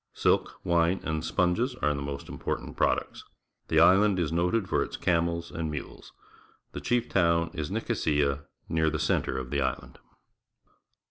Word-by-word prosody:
Silk, - - +1
wine, 85 +2 +2
and 80 0 -2
sponges 105 +8 +1
are 75 -10 0
the 70 - -4
most 70 0 -5
important - - -4
products. - - 0 0.4
The - - +3
island 100 +1 +5
is 85 -4 0
noted 90 +5 +1
for - - +1
its - - -3
camels 85 -1 0
and 80 -2 -3
mules. 75 -2 -7 0.6
The - - -6
chief 120 -1 0
town 85 -2 +2
is 80 -4 -4
Nicosia, 75 -1 0 0.2
near 80 -1 +1
the 80 - -2
centre 65 - 0
of 65 -1 -5
the 70 -1 0
island. 65 - -3
85 Hz, 155 wpm, -28 LUFS, 75-90 Hz, 0.6 s, island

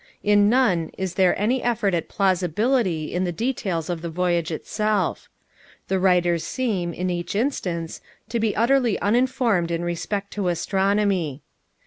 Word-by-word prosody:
In 205 0 +4
none 200 -10 +2
is 190 -2 -3
there 190 -2 +2
any 240 +6 +1
effort 225 -5 0
at 165 -2 -1
plausibility 190 - +1
in 180 - 0
the 180 - -1
details 190 -6 -2
of 175 -2 -3
the 170 - -4
voyage 175 0 0
itself. 210 +5 -1 0.6
The 190 - +1
writers 175 -3 +2
seem, 200 -7 -2
in 180 +2 -2
each 175 +1 -4
instance, 180 - -2 0.3
to 235 0 -1
be 220 -2 0
utterly 240 -1 +2
uninformed 230 -5 +1
in 170 0 -2
respect 195 +4 -3
to 200 -3 -2
astronomy. 190 -4 0
190 Hz, 145 wpm, -23 LUFS, 175-215 Hz, 0.6 s, In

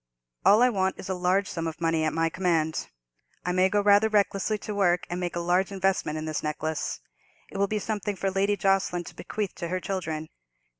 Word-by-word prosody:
"All 215 +4 +6
I 250 - +6
want 190 -3 0
is 190 - -8
a - - +1
large 185 +2 +1
sum 165 -1 -3
of 160 - -6
money 165 -1 +1
at 155 - +1
my 165 0 +1
command. 165 -2 0 0.6
I 180 - +1
may 185 +1 +3
go 205 +1 +2
rather 205 +2 +5
recklessly 205 0 +1
to 210 - -6
work 180 -3 +2
and 175 - -2
make 175 -1 -3
a - - -1
large 180 +3 +1
investment 190 -5 0
in 155 - -4
this 155 -1 -2
necklace; 155 0 -3 0.5
it - - -6
will 200 - +3
be 215 - -1
something 205 -1 -2
for 190 +1 -1
Lady 200 +2 +1
Jocelyn 195 -2 +1
to - - -11
bequeath 210 -3 -4
to 170 - -4
her 185 +2 -1
children. 160 -5 -4
185 Hz, 215 wpm, -27 LUFS, 165-200 Hz, 0.6 s, All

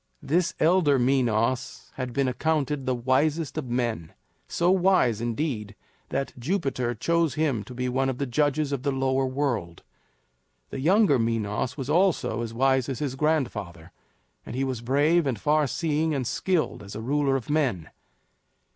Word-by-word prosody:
This 175 +4 +1
elder 160 -4 +4
Minos 125 -1 0
had 130 -1 -4
been 135 +2 0
accounted 145 +1 -1
the 130 - +1
wisest 140 +5 0
of 150 -5 -4
men 120 -9 -2 0.3
so 175 +1 +1
wise, 180 - +3
indeed, 115 -3 -3 0.3
that 135 - -2
Jupiter 130 -5 -1
chose 165 +4 +1
him 145 -9 0
to 125 - -10
be 125 +1 -2
one 135 +2 0
of 130 - -3
the 140 - -1
judges 145 +2 0
of 140 -3 -2
the 140 +1 0
Lower 135 0 0
World. 125 - -2 0.9
The - - -5
younger 175 - +4
Minos 115 +2 -1
was 135 -3 -4
almost 175 +4 +3
as 115 +1 -3
wise 130 +2 +1
as 135 - -3
his 140 -1 -2
grandfather; 125 - -2 0.5
and 115 - -8
he 135 - 0
was 130 -4 -3
brave 145 +6 +2
and 120 -6 -1
far 150 +2 +2
seeing 155 +1 0
and 130 -2 -2
skilled 175 - -1
as 100 -1 -10
a 110 - -5
ruler 140 +1 +1
of 130 -4 -3
men. 135 - 0
135 Hz, 165 wpm, -26 LUFS, 120-150 Hz, 0.9 s, elder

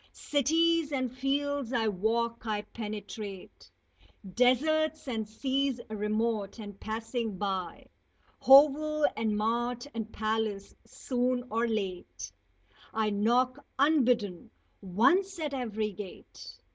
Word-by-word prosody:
Cities 320 +2 +2
and 255 -3 -2
fields 280 0 -1
I 225 -2 +1
walk; 230 +4 -1
I 210 -1 -1
penetrate 210 -3 -7 0.6
Deserts 310 - +2
and 220 -4 -3
seas 265 +2 -1
remote, 215 0 -1
and 205 -3 -9
passing 225 -1 -3
by 190 -2 -3 0.6
Hovel 300 +2 +6
and 220 -1 0
mart 240 +3 -1
and 225 -1 -5
palace 215 -2 -2
soon 250 -1 -1
or 230 +2 +1
late 195 -5 -4 0.6
I 220 -1 0
knock, 245 +6 +1
unbidden, 250 - +2 0.3
once 270 - +2
at 305 -4 -3
every 220 -5 -2
gate! 190 -1 -10
235 Hz, 105 wpm, -30 LUFS, 215-275 Hz, 0.6 s, Hovel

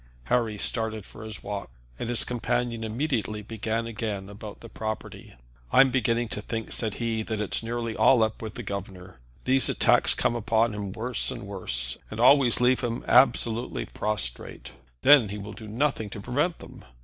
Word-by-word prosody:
Harry 115 -4 +1
started 110 -1 -1
for - - -11
his 110 -2 -7
walk, 100 -6 -5 0.3
and - - -3
his 120 - +3
companion 120 -1 -1
immediately 110 -3 -2
began 115 +1 -2
again 105 -4 -4
about 105 0 -10
the 115 - -9
property. 110 - -6 0.4
"I'm 135 -1 +6
beginning 120 -2 +1
to 105 - -4
think," 110 +1 -5
said 110 -3 0
he, 115 -2 -1
"that 110 -1 -3
it's 105 - 0
nearly 115 0 -3
all 125 -4 +5
up 110 0 -2
with 110 -1 -6
the 120 - -6
governor. 95 - -7 0.3
These 130 0 +3
attacks - - +4
come 120 - +1
upon 115 0 +1
him 100 -2 -4
worse 115 +3 -2
and - - -5
worse, 65 -12 -2
and 110 - -7
always 130 0 +6
leave 125 +1 +4
him 120 -1 -3
absolutely 120 -2 +3
prostrate. 105 - -3 0.3
Then 135 -7 +7
he 105 - -5
will 100 0 -7
do 110 - -10
nothing 115 -1 -1
to 105 - -7
prevent 145 - -1
them. - - -13
110 Hz, 175 wpm, -26 LUFS, 105-120 Hz, 0.4 s, Then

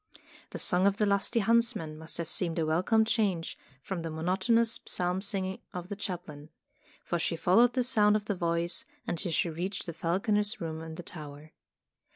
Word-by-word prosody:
The - - -6
song 180 +2 +4
of 200 0 +1
the 210 - +2
lusty 200 +3 +2
huntsman 225 -7 +2
must 160 +1 -5
have 170 - -3
seemed 170 0 0
a 165 - +1
wel 160 +2 +2
come 220 +3 +3
change 200 -7 0 0.3
from 190 +1 -4
the 165 - -4
monotonous 190 +8 +1
psalm 180 +1 0
singing 190 -2 -2 0.2
of 180 +1 -5
the 205 - -3
chaplain; 175 -7 -6 0.6
for 175 - -1
she 165 - 0
followed 230 +9 +4
the 255 0 +1
sound 210 -4 +4
of 210 -1 -1
the 210 - 0
voice, 170 -1 -1 0.2
until 175 +1 -3
she 165 +1 +1
reached 180 +5 -4
the 170 - -5
falconer's 205 +6 +1
room 160 -1 -4
in 160 0 -7
the 175 - -7
tower. 155 -3 -10
180 Hz, 190 wpm, -30 LUFS, 165-210 Hz, 0.6 s, song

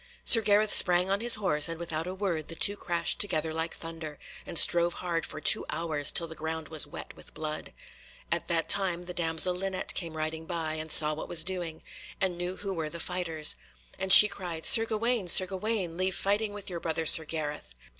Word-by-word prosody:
Sir 225 - +6
Gareth 210 0 +1
sprang 180 +1 +4
on 200 +2 -2
his 240 0 +6
horse, 160 -7 +1
and 165 - -6
without 165 -1 -5
a 185 - -7
word 180 -6 -5
the 165 - -8
two 200 +4 +1
crashed 170 -4 -2
together 160 -5 -3
like 160 +1 -5
thunder, 160 -2 -10 0.3
and 170 - -6
strove 170 +1 +4
hard 165 -3 -5
for 155 - -9
two - - +5
hours, 155 -3 +1
till 170 - +3
the 165 - -10
ground 160 -1 -7
was 155 -2 +2
wet - - -11
with - - -10
blood. 155 -1 -7 0.6
At 170 0 -3
that 165 -2 -2
time 180 -3 +1
the 180 0 -9
damsel 165 +1 0
Linet 190 +1 -3
came 165 -3 -6
riding 160 +1 -6
by, 165 -3 -5
and 155 0 -6
saw 155 0 +6
what 155 - -9
was 165 -2 +1
doing, 175 -3 -7 0.4
and 190 -3 -2
knew 175 +1 -6
who 200 -1 -6
were 160 -3 -6
the 170 - -8
fighters. 165 -3 0 0.4
And 190 - -4
she 210 - +10
cried 175 -5 -8
"Sir 225 -1 +6
Gawaine, 225 -2 -3
Sir 185 +2 +7
Gawaine, 190 -2 -4
leave 185 0 -2
fighting 205 +2 -2
with 205 -1 -11
your 175 -2 -6
brother 160 -1 -5
Sir 160 - +8
Gareth." 150 - -7
170 Hz, 210 wpm, -26 LUFS, 160-190 Hz, 0.6 s, she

